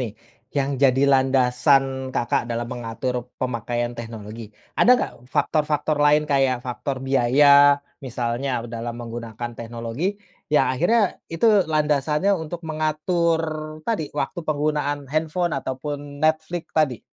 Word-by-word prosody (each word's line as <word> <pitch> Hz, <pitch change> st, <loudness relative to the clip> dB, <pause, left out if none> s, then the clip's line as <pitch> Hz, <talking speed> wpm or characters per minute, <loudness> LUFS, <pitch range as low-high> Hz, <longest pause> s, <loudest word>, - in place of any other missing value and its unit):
nih, 115 Hz, -4 st, -4 dB, 0.4 s
yang 140 Hz, -1 st, 0 dB
jadi 135 Hz, 0 st, +4 dB
landasan 130 Hz, 0 st, +3 dB
Kakak 120 Hz, 0 st, 0 dB
dalam 120 Hz, 0 st, -2 dB
mengatur 120 Hz, +1 st, -4 dB
pemakaian 120 Hz, -1 st, -2 dB
teknologi, 115 Hz, -2 st, -8 dB, 0.2 s
ada -, -, +4 dB
nggak -, -, -2 dB, 0.2 s
faktor-faktor 150 Hz, +1 st, 0 dB
lain 150 Hz, +1 st, +4 dB
kayak 135 Hz, -4 st, +1 dB
faktor 130 Hz, +2 st, -3 dB
biaya, 140 Hz, +2 st, +6 dB, 0.2 s
misalnya 120 Hz, 0 st, -2 dB
dalam 115 Hz, 0 st, -4 dB
menggunakan 120 Hz, 0 st, -6 dB
teknologi 115 Hz, -, -4 dB, 0.3 s
yang 150 Hz, -, +4 dB
akhirnya 195 Hz, -, +1 dB
itu 165 Hz, +6 st, -3 dB, 0.2 s
landasannya 150 Hz, +4 st, +1 dB
untuk 165 Hz, 0 st, -6 dB
mengatur 160 Hz, +2 st, 0 dB, 0.5 s
tadi 210 Hz, -11 st, -1 dB
waktu 145 Hz, +5 st, -2 dB
penggunaan 150 Hz, -1 st, -1 dB
handphone 160 Hz, +2 st, 0 dB
ataupun 145 Hz, +2 st, -4 dB
Netflix 160 Hz, +2 st, 0 dB
tadi? 145 Hz, -7 st, +1 dB
140 Hz, 115 wpm, -23 LUFS, 120-155 Hz, 0.5 s, biaya